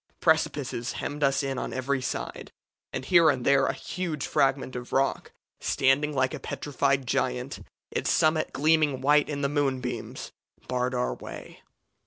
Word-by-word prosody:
Precipices 120 Hz, +1 st, +1 dB
hemmed 145 Hz, +1 st, -5 dB
us 140 Hz, 0 st, +2 dB
in 135 Hz, -2 st, -2 dB
on -, -, -4 dB
every 130 Hz, +1 st, -1 dB
side; -, -, -4 dB, 0.4 s
and 130 Hz, -, -4 dB
here 170 Hz, 0 st, +6 dB
and 130 Hz, -4 st, 0 dB
there 140 Hz, -1 st, +4 dB
a -, -, 0 dB
huge 170 Hz, -6 st, -4 dB
fragment 135 Hz, -1 st, +1 dB
of 125 Hz, 0 st, -6 dB
rock, 135 Hz, +1 st, 0 dB, 0.3 s
standing 135 Hz, +3 st, +2 dB
like 130 Hz, +1 st, +1 dB
a 155 Hz, -, -4 dB
petrified 140 Hz, -1 st, -1 dB
giant, 60 Hz, -, -1 dB, 0.3 s
its -, -, -1 dB
summit 155 Hz, 0 st, +2 dB
gleaming 150 Hz, -2 st, +2 dB
white 145 Hz, +2 st, +4 dB
in 145 Hz, -1 st, -3 dB
the 140 Hz, -, +2 dB
moonbeams, 135 Hz, -3 st, -2 dB, 0.4 s
barred 125 Hz, 0 st, -1 dB
our 125 Hz, 0 st, 0 dB
way. -, -, -10 dB
135 Hz, 155 wpm, -27 LUFS, 130-150 Hz, 0.4 s, here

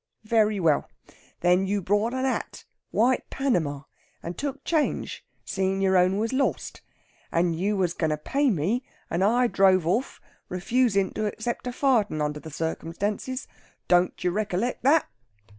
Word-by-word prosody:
Very 215 Hz, -2 st, +2 dB
well! 160 Hz, -5 st, +2 dB, 0.5 s
Then 180 Hz, +2 st, +3 dB
you 205 Hz, +1 st, 0 dB
bought 205 Hz, +5 st, +1 dB
a 260 Hz, -, -1 dB
hat 265 Hz, -, -2 dB, 0.2 s
white 245 Hz, +3 st, +1 dB
Panama 160 Hz, -, -1 dB, 0.4 s
and 170 Hz, +1 st, -5 dB
took 280 Hz, -1 st, -4 dB
change, 315 Hz, -3 st, -1 dB, 0.2 s
seein' 190 Hz, 0 st, -1 dB
your 190 Hz, -1 st, +2 dB
own 185 Hz, +1 st, +4 dB
was 225 Hz, +4 st, -1 dB
lost. 270 Hz, +1 st, -1 dB, 0.5 s
And 170 Hz, 0 st, +1 dB
you 200 Hz, +5 st, 0 dB
was 180 Hz, -3 st, +1 dB
going 160 Hz, -3 st, -1 dB
to 155 Hz, -, 0 dB
pay 275 Hz, -, +1 dB
me, 205 Hz, -, 0 dB, 0.3 s
and 170 Hz, +3 st, +1 dB
I 240 Hz, +5 st, +3 dB
drove 190 Hz, -6 st, +4 dB
off, 220 Hz, +10 st, -1 dB, 0.3 s
refusin' 200 Hz, +1 st, +1 dB
to 215 Hz, 0 st, -1 dB
accept 235 Hz, +4 st, -4 dB
a -, -, -1 dB
farden 240 Hz, -, +1 dB
under 150 Hz, 0 st, -1 dB
the 160 Hz, -, -9 dB
circumstances. 185 Hz, -, -3 dB, 0.4 s
Don't 180 Hz, 0 st, +2 dB
you 180 Hz, -, +2 dB
rec'lect 210 Hz, +4 st, -1 dB
that?' 295 Hz, +4 st, +4 dB
195 Hz, 155 wpm, -26 LUFS, 175-245 Hz, 0.5 s, own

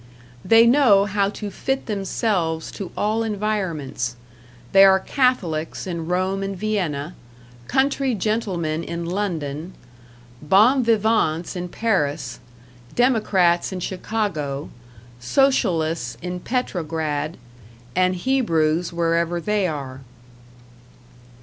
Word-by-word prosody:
They 225 Hz, 0 st, +6 dB
know 235 Hz, -6 st, +5 dB
how 200 Hz, 0 st, +1 dB
to 210 Hz, 0 st, -6 dB
fit 270 Hz, +7 st, -2 dB
themselves 195 Hz, -5 st, -1 dB
to 195 Hz, -3 st, -7 dB
all 215 Hz, +2 st, +1 dB
environments; 190 Hz, -, -2 dB, 0.6 s
they 195 Hz, 0 st, +7 dB
are 190 Hz, -1 st, +6 dB
Catholics 190 Hz, -, 0 dB
in 170 Hz, -3 st, -4 dB
Rome 185 Hz, +2 st, 0 dB
and 195 Hz, -1 st, -4 dB
Vienna, 175 Hz, -7 st, -2 dB, 0.5 s
country 270 Hz, -1 st, +1 dB
gentlemen 180 Hz, -7 st, -1 dB
in 170 Hz, 0 st, -5 dB
London, 170 Hz, -3 st, -3 dB, 0.7 s
bons 225 Hz, -, +4 dB
vivants 215 Hz, -7 st, +1 dB
in 180 Hz, 0 st, -4 dB
Paris, 150 Hz, -, -1 dB, 0.6 s
democrats 205 Hz, -9 st, +2 dB
in 185 Hz, -, -4 dB
Chicago, 175 Hz, -7 st, -3 dB, 0.5 s
Socialists 165 Hz, -, +1 dB
in 180 Hz, +1 st, -5 dB
Petrograd, 160 Hz, -, -2 dB, 0.6 s
and 185 Hz, 0 st, +2 dB
Hebrews 175 Hz, -8 st, +1 dB
wherever 170 Hz, 0 st, 0 dB
they 205 Hz, +1 st, 0 dB
are. 135 Hz, -4 st, -5 dB
185 Hz, 100 wpm, -22 LUFS, 160-215 Hz, 0.7 s, they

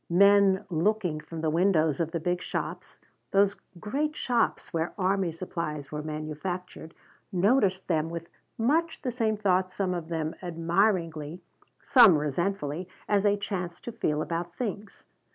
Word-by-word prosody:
Men 200 Hz, +2 st, +5 dB
looking 175 Hz, -1 st, +1 dB
from 160 Hz, +1 st, -7 dB
the 160 Hz, -1 st, +1 dB
windows 160 Hz, -4 st, +2 dB
of 165 Hz, -2 st, 0 dB
the 170 Hz, 0 st, -3 dB
big 175 Hz, +2 st, -1 dB
shops -, -, -5 dB, 0.3 s
those 200 Hz, 0 st, +3 dB, 0.2 s
great 290 Hz, -, -2 dB
shops 240 Hz, -8 st, 0 dB
where 165 Hz, 0 st, -1 dB
army 190 Hz, -2 st, +1 dB
supplies 155 Hz, -4 st, -5 dB
were 150 Hz, 0 st, -3 dB
manufactured 155 Hz, +3 st, -5 dB, 0.4 s
noticed 190 Hz, 0 st, +2 dB
them 160 Hz, -2 st, +1 dB
with 170 Hz, 0 st, -6 dB, 0.3 s
much 320 Hz, +9 st, +1 dB
the 255 Hz, -, -1 dB
same 225 Hz, -3 st, 0 dB
thought, 185 Hz, -3 st, +1 dB
some 185 Hz, -1 st, -1 dB
of 170 Hz, -2 st, -4 dB
them 160 Hz, -1 st, -2 dB
admiringly, 170 Hz, -2 st, 0 dB, 0.4 s
some 235 Hz, -, +7 dB
resentfully, 160 Hz, +2 st, -2 dB, 0.2 s
as 205 Hz, -1 st, +3 dB
they 205 Hz, 0 st, +3 dB
chanced 185 Hz, -4 st, -4 dB
to 235 Hz, -, -4 dB
feel 155 Hz, -8 st, -1 dB
about 170 Hz, 0 st, -4 dB
things. 210 Hz, -3 st, -5 dB
180 Hz, 145 wpm, -28 LUFS, 160-200 Hz, 0.4 s, some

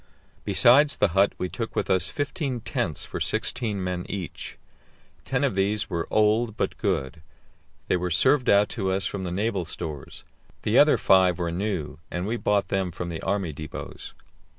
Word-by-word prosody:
Besides 140 Hz, +5 st, +5 dB
the -, -, +2 dB
hut 95 Hz, +4 st, +3 dB
we 90 Hz, -, -2 dB
took 115 Hz, +4 st, -5 dB
with -, -, 0 dB
us 95 Hz, -2 st, +3 dB
fifteen 145 Hz, -4 st, -3 dB
tents 120 Hz, -, -2 dB
for -, -, -6 dB
sixteen 105 Hz, -5 st, -1 dB
men 90 Hz, -1 st, -2 dB
each. 95 Hz, -5 st, -6 dB, 0.7 s
Ten -, -, 0 dB
of -, -, +1 dB
these 100 Hz, +2 st, 0 dB
were 85 Hz, -2 st, -2 dB
old, 110 Hz, +1 st, +2 dB
but -, -, -1 dB
good; 80 Hz, -, -2 dB, 0.7 s
they -, -, +2 dB
were 90 Hz, 0 st, -2 dB
served 125 Hz, -, +3 dB
out 100 Hz, +1 st, +5 dB
to 95 Hz, -5 st, -2 dB
us 95 Hz, -1 st, 0 dB
from 95 Hz, -1 st, -3 dB
the 90 Hz, -, -3 dB
naval 100 Hz, 0 st, -1 dB
stores; 80 Hz, -4 st, -7 dB, 0.4 s
the -, -, 0 dB
other -, -, +6 dB
five 95 Hz, -2 st, +4 dB
were 85 Hz, -2 st, -2 dB
new, 90 Hz, -5 st, -3 dB
and 90 Hz, +1 st, -3 dB
we 110 Hz, +3 st, -1 dB
bought 100 Hz, -4 st, 0 dB
them 95 Hz, -2 st, 0 dB
from 85 Hz, 0 st, -5 dB
the 80 Hz, -2 st, -5 dB
army 95 Hz, -5 st, -1 dB
depots. 75 Hz, +1 st, -8 dB
95 Hz, 175 wpm, -25 LUFS, 90-110 Hz, 0.7 s, other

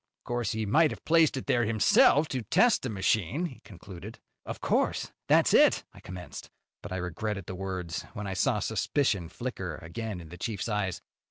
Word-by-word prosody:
Of -, -, -48 dB
course, 120 Hz, -3 st, -2 dB
he 110 Hz, 0 st, -2 dB
might 155 Hz, +10 st, +4 dB
have -, -, -9 dB
placed 160 Hz, -3 st, +4 dB
it 130 Hz, -, -5 dB
there 120 Hz, -, +2 dB
himself 150 Hz, -, +4 dB
to 130 Hz, -, -2 dB
test 225 Hz, -, +3 dB
the 130 Hz, -, -3 dB
machine," 110 Hz, -, 0 dB
he 145 Hz, -8 st, -7 dB
concluded. 95 Hz, +2 st, -11 dB, 0.3 s
"Of -, -, -5 dB
course, -, -, 0 dB, 0.2 s
that's -, -, +4 dB
it," -, -, +5 dB
I -, -, -14 dB
commenced. 90 Hz, -1 st, -9 dB, 0.3 s
But -, -, -9 dB
I 95 Hz, -, -2 dB
regretted 95 Hz, +2 st, -3 dB
the 95 Hz, -, -6 dB
words 90 Hz, -2 st, -4 dB
when 105 Hz, -2 st, -5 dB
I 95 Hz, -, -3 dB
saw 105 Hz, +5 st, +1 dB
suspicion 105 Hz, -, 0 dB
flicker 95 Hz, -7 st, -5 dB
again 95 Hz, +6 st, -6 dB
in 80 Hz, -2 st, -11 dB
the 90 Hz, +2 st, -11 dB
chief's 110 Hz, +2 st, -3 dB
eyes. 105 Hz, -5 st, -2 dB
105 Hz, 190 wpm, -29 LUFS, 90-125 Hz, 0.3 s, it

